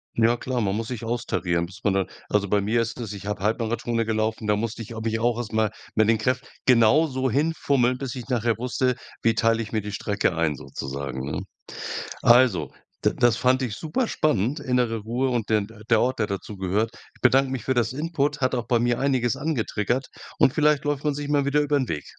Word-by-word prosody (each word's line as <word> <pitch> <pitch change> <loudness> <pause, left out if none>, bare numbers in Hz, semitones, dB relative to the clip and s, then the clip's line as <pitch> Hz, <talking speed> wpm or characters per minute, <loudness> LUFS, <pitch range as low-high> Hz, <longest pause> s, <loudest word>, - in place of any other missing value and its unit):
Ja 115 +1 +3
klar, 125 -1 -2
man 100 -1 0
muss 110 +1 -3
sich 120 -2 -5
austarieren, 100 -7 -1
bis 95 +3 -12
man 100 - +2
da 95 -1 +2 0.2
also 100 -1 +1
bei 100 +1 +2
mir 115 +4 +1
ist 115 +2 -6
das, 110 -3 -5
ich 100 -1 -9
habe 105 -1 -3
Halbmarathons 115 +1 0
gelaufen, 110 0 -1
da 105 0 +3
musste 115 +2 -3
ich 110 - -11
mich 110 0 0
auch 120 0 +1
erst 115 -2 -5
mal 110 -1 +2 0.2
mit 110 -1 +4
den 110 -1 +3
Kräft 125 +3 -1 0.2
genauso 130 +2 +4
hinfummeln, 140 -3 +1
bis 135 -2 -4
ich 125 0 -8
nachher 120 -2 +1
wusste, 125 0 0 0.3
wie 115 - +4
teile 115 0 +2
ich 105 - -10
mir 110 - 0
die 105 +1 -6
Strecke 100 -3 -1
ein 80 -3 +1
sozusagen, 65 0 -5
ne? - - -3 0.8
Also 120 - +5 0.3
d - - +3
das 120 -1 +3
fand 130 +1 +3
ich 110 -5 -3
super 160 - -1
spannend, 145 - 0
innere 125 -3 0
Ruhe 120 +5 -1
und 120 -4 -1
den 105 -2 +1
d 115 - -15
der 115 -2 +4
Ort, 130 +1 0
der 110 - +1
dazugehört. 100 +1 -2 0.2
Ich - - -25
bedanke 130 +1 +4
mich 130 -4 -4
für 130 - +1
das 120 +1 +1
Input, 150 -1 -1
hat 130 - +2
auch 120 -3 -2
bei 120 -1 +3
mir 120 0 +1
einiges 130 -2 +1
angetriggert 125 -4 -1 0.3
und 135 - +5
vielleicht 150 -1 +2
läuft 145 -1 -1
man 150 -1 +1
sich 145 0 -5
mal 145 -1 +2
wieder 145 +1 +3
über 145 0 +1
'n 130 - -2
Weg. 75 -3 -3
120 Hz, 220 wpm, -25 LUFS, 105-130 Hz, 0.8 s, Also